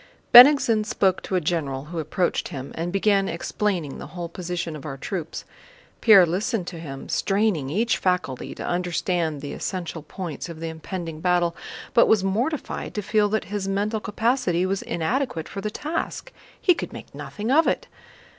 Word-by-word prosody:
Bennigsen 245 -4 +9
spoke 195 -3 +1
to 190 - -3
a - - +4
general 145 -5 -2
who 165 +2 -5
approached 160 +3 -1
him, 135 -1 -7
and 170 +2 -3
began 195 0 +2
explaining 170 -3 -2
the - - -7
whole 170 +2 -6
position 170 -2 -4
of 145 - -9
our 135 -3 -6
troops. 165 +2 -5 0.6
Pierre 200 -6 +8
listened 185 +3 -1
to 170 -2 -7
him, 135 -4 -8
straining 195 -9 +1
each 220 +9 +1
faculty 180 -9 -1
to - - -6
understand 175 -3 -1
the 145 - -6
essential 175 -4 -4
points 165 0 -6
of 165 -2 -8
the 165 0 -4
impending 160 0 -6
battle, 175 -1 +2 0.4
but 235 - +6
was 215 -3 +4
mortified 240 +11 -2
to 210 - -2
feel 210 +1 +2
that 220 +1 0
his 200 -2 -2
mental 205 +3 0
capacity 215 -4 0
was 195 +1 -1
inadequate 170 - -2
for 195 - -6
the 210 - -2
task. 330 - -4 0.3
He 360 - +5
could - - -6
make - - -10
nothing 215 +4 -4
of 315 +4 +5
it. - - 0
185 Hz, 175 wpm, -24 LUFS, 165-210 Hz, 0.6 s, Bennigsen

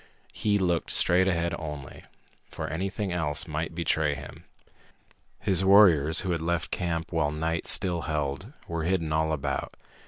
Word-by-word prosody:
He 105 -1 +1
looked 90 -4 0
straight 90 +2 +4
ahead 85 -2 0
only, 75 -4 -8 0.4
for - - -5
anything 95 - -3
else 75 -4 -1
might 80 +1 -4
betray 80 -3 +1
him. 70 +2 -11 0.9
His 95 -3 +1
warriors, 90 -6 +5
who 95 - -2
had 85 -2 -1
left 85 0 -2
camp 85 -2 -2
while 75 - +1
night 80 +2 -2
still 90 -2 +2
held, 75 - -3 0.2
were 85 -1 -3
hidden 85 -4 0
all 80 0 +1
about. 70 -2 -3
85 Hz, 150 wpm, -27 LUFS, 75-90 Hz, 0.9 s, warriors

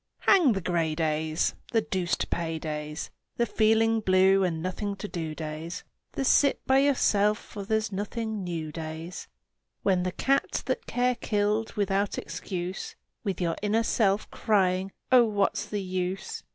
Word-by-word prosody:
Hang 345 - +5
the 195 - -2
gray 165 -3 0
days! 155 0 0 0.2
The 225 - +4
deuce 185 -4 -1
to - - -2
pay 165 -1 -2
days! 150 0 -5 0.3
The 235 - +3
feeling 225 0 +3
blue 190 -1 +4
and 170 -3 0
nothing 195 +4 -3
to 205 +1 -6
do 160 -5 -4
days! 155 +2 -5 0.3
The 270 - -2
sit 280 +1 +3
by 265 0 +4
yourself 215 -7 +3
for 205 -2 -8
there's 220 +1 0
nothing 210 +1 -3
new 165 -3 -4
days! 160 +2 -6 0.6
When 185 -2 +3
the 185 0 -1
cat 275 +9 0
that - - -2
Care 250 0 +1
killed 210 -1 0
without 200 -1 0
excuse 180 -1 -5 0.3
With 195 -4 -2
your 170 -2 0
inner 215 +2 +2
self's 205 -3 +2
crying, 190 -2 +1 0.2
"Oh, 250 -2 +7
what's 205 -3 0
the 205 -2 -3
use?" 185 +1 -3
195 Hz, 155 wpm, -27 LUFS, 170-220 Hz, 0.6 s, Oh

